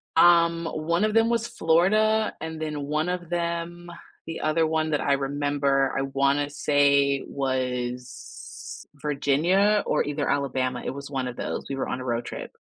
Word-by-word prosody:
Um, 170 -1 +5
one 165 +3 -1
of 215 0 +1
them 225 +1 +4
was 235 0 0
Florida, 215 +7 +2
and 160 0 -6
then 150 -2 -3
one 155 +4 -1
of 180 -2 -4
them 175 0 -3 0.4
the 165 - -5
other 155 +1 +2
one 160 0 0
that 150 - +1
I 140 - +2
remember, 140 0 +1
I 135 - 0
wanna 140 +1 +1
say 140 -1 +2
was 125 -2 -5
Virginia 150 +8 +2
or - - +2
either 145 0 -2
Alabama. 130 -3 -1
It - - -1
was 140 +1 -8
one 135 -3 -2
of 125 - -6
those. - - -4
We 135 - -3
were 135 - -2
on 125 - -3
a 130 - -6
road 120 -1 -1
trip. - - -7
145 Hz, 170 wpm, -25 LUFS, 140-170 Hz, 0.4 s, Um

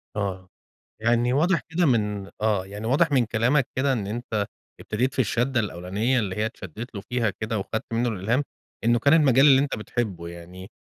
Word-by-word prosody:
آه. 95 -3 -3 0.5
يعني 120 +2 +2
واضح 165 +5 +2
كده 175 +1 +1
من 105 -7 0
آه. 105 -4 +1
يعني 105 +3 -6
واضح 150 +5 +3
من 130 -4 +3
كلامك 120 +5 +2
كده 135 0 +2
إن 105 -5 -2
أنت 110 -1 -2 0.3
ابتديت 125 +5 -1
في - - -5
الشَدّة 120 +2 +1
الأولانية، 105 +6 -1
اللي 100 -5 -2
هي 105 - 0
اتشدّيت 110 +3 -7
له 100 - -4
فيها 120 -3 +1
كده 110 +2 -3
وخدت 110 +3 -3
منّه 120 +1 +1
الإلهام، 115 +7 0 0.4
إنه 120 +1 +3
كان 140 +5 +4
المجال 140 -4 +5
اللي 135 -2 +7
أنت 140 -1 -1
بتحبه 105 -6 -3
يعني 85 +3 -10
115 Hz, 185 wpm, -25 LUFS, 100-130 Hz, 0.5 s, اللي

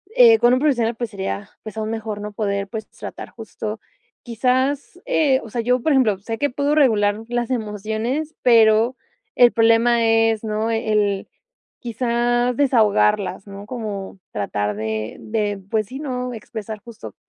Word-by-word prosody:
eh, 470 -3 +7
con 240 - +5
un 255 - +3
profesional, 240 -6 +1
pues, 235 -1 -4
sería, 200 0 -4
pues, 215 -1 -9
aún 220 0 -2
mejor, 220 -2 -4
¿no?, 210 0 -5
poder, 200 -1 -2
pues, 220 +1 -7
tratar - - -9
justo. 220 0 -7 0.4
Quizás, 260 +7 -1
eh, 275 -4 +2
o 225 - -10
sea, 235 - -1
yo, 250 +2 +1
por 315 - +1
ejemplo, 235 -7 +3
sé 225 +3 -5
que 285 - +1
puedo 285 +3 0
regular 215 -8 +3
las 240 0 -2
emociones, 220 +6 -3
pero, 225 0 +5 0.4
el 245 -1 +6
problema 230 +1 +4
es, 225 -1 +2
¿no?, 220 +1 -1
el 210 -3 0 0.5
quizá 240 +1 0
desahogarlas, 215 -6 +2
¿no?, 200 0 -9
como 210 -5 -6
tratar 105 0 -2
de 110 0 -3
de, 210 -2 -2
pues 215 -2 0
sí, 260 - -7
¿no?, 250 -4 -3
expresar 215 -1 -7
justo 235 -1 -10
225 Hz, 155 wpm, -21 LUFS, 210-245 Hz, 0.5 s, eh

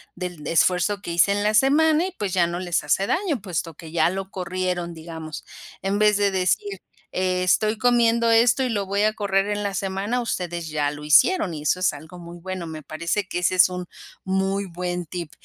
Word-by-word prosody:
del 175 -4 -6
esfuerzo 180 +5 +2
que 170 - -5
hice 170 +4 +3
en 205 0 -1
la 210 - +2
semana". 305 +8 +4
Y - - -6
pues 200 -3 -3
ya 175 -3 +3
no 170 +1 -4
les 175 -2 -1
hace 170 +7 +1
daño, 330 - -1
puesto 175 -3 -4
que 160 0 -11
ya 165 0 +3
lo 190 +1 -5
corrieron, 180 -2 -3
digamos, 160 -1 -8 0.4
en 195 +2 -1
vez 210 0 +4
de 205 -1 +2
decir: 190 - 0 0.4
"E 185 0 0
estoy 215 +4 +2
comiendo 235 0 +3
esto 235 +3 +4
y 255 - 0
lo 200 -4 -2
voy 200 +1 0
a 215 0 +2
correr 200 -2 0
en 205 0 -1
la 200 -1 -2
semana". 195 +5 -2
Ustedes 175 -7 -3
ya 150 -2 0
lo 150 0 -9
hicieron 180 - +4
y 150 - -6
eso 165 +4 +1
es 180 - +2
algo 160 +5 -11
muy 170 0 -10
bueno, 185 0 -5
me 155 -1 -7
parece 170 +6 -2
que 175 - -3
ese 180 +1 +1
es, 185 - +6
un 180 0 -5 0.4
muy 190 +1 0
buen 180 -1 -4
tip. 170 -1 -6
185 Hz, 215 wpm, -23 LUFS, 170-210 Hz, 0.4 s, es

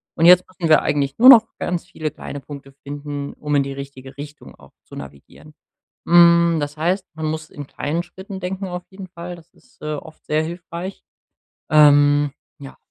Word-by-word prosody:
Und 165 - +2
jetzt 180 +1 +7
müssen 180 -3 -4
wir 155 - +6
eigentlich 140 -1 -1
nur 255 +3 +9
noch 240 -5 +9
ganz 175 -1 -3
viele 155 -3 -5
kleine 145 - -8
Punkte 140 -1 -11
finden, 145 0 -6
um 150 0 -5
in 140 - +3
die 135 0 -6
richtige 135 -1 -10
Richtung 145 +1 -10
auch - - -19
zu - - -14
navigieren. 70 - -12 0.5
Hm, 170 -1 +6
das 145 +1 -4
heißt, 180 +5 0
man 160 -1 -5
muss 155 0 -4
in 145 - -9
kleinen 160 +5 -3
Schritten 190 +2 -10
denken, 190 +1 -4
auf 180 -1 -6
jeden 190 0 -10
Fall, 175 0 -8
das 170 -1 -18
ist, 255 - -28
äh, 155 0 -4
oft 160 +2 -11
sehr 155 +1 0
hilfreich. 175 +3 -7 0.7
Ähm, 145 -1 +5 0.3
ja, 135 -1 -11
155 Hz, 185 wpm, -20 LUFS, 145-175 Hz, 0.7 s, nur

